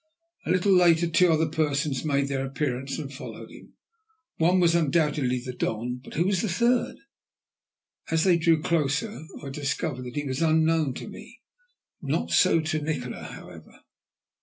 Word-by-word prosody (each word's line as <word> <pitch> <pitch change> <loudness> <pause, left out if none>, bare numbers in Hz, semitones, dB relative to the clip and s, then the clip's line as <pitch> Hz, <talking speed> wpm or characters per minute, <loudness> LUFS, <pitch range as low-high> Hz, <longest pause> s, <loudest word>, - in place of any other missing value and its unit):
A - - -3
little 185 +2 +2
later 170 -2 +4
two 170 +1 +4
other 160 0 +2
persons 150 -3 -1
made 140 -2 +1
their 135 -1 -2
appearance 135 -1 -3
and 145 -3 -6
followed 135 - -9
him. - - -15 0.6
One 175 +3 +3
was 170 -2 +4
undoubtedly 150 -5 +1
the 125 - -5
Don, 125 +2 -3
but - - -11
who 170 +3 +1
was 190 -2 +1
the 220 - -1
third? 235 +6 +1 1.1
As 160 0 +2
they 180 -3 +4
drew 165 -2 +2
closer, 170 +5 -1 0.2
I 140 - -6
discovered 140 -1 -3
that 125 - -8
he 145 0 -2
was 135 +2 -3
unknown 160 -3 +2
to - - -7
me; - - -12 0.6
not - - -2
so 165 - +4
to 155 0 -2
Nikola, 145 -5 -4
however. - - -12
155 Hz, 160 wpm, -26 LUFS, 140-170 Hz, 1.1 s, later